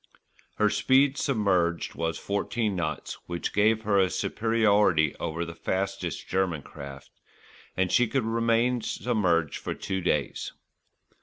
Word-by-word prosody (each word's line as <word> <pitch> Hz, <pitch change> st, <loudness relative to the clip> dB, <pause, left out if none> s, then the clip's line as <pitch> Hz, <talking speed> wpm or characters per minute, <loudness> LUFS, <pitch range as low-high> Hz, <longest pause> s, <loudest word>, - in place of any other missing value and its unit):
Her 105 Hz, -1 st, +2 dB
speed 135 Hz, +1 st, +3 dB
submerged 95 Hz, -, +1 dB
was 80 Hz, 0 st, -2 dB
fourteen 105 Hz, +1 st, -1 dB
knots, 80 Hz, -4 st, -3 dB
which 85 Hz, -1 st, -3 dB
gave 110 Hz, +2 st, +3 dB
her 100 Hz, -2 st, +2 dB
a 95 Hz, -1 st, +3 dB
superiority 105 Hz, -7 st, +2 dB
over 85 Hz, +2 st, -3 dB
the 85 Hz, -, -7 dB
fastest 95 Hz, +3 st, -3 dB
German 90 Hz, -6 st, 0 dB
craft, 70 Hz, -1 st, -10 dB, 0.7 s
and 95 Hz, -1 st, +1 dB
she 125 Hz, -1 st, +4 dB
could 115 Hz, +1 st, 0 dB
remain 115 Hz, +2 st, +1 dB
submerged 90 Hz, -, 0 dB
for -, -, -4 dB
two 95 Hz, -1 st, -3 dB
days. 75 Hz, -5 st, -1 dB
100 Hz, 130 wpm, -27 LUFS, 85-115 Hz, 0.7 s, she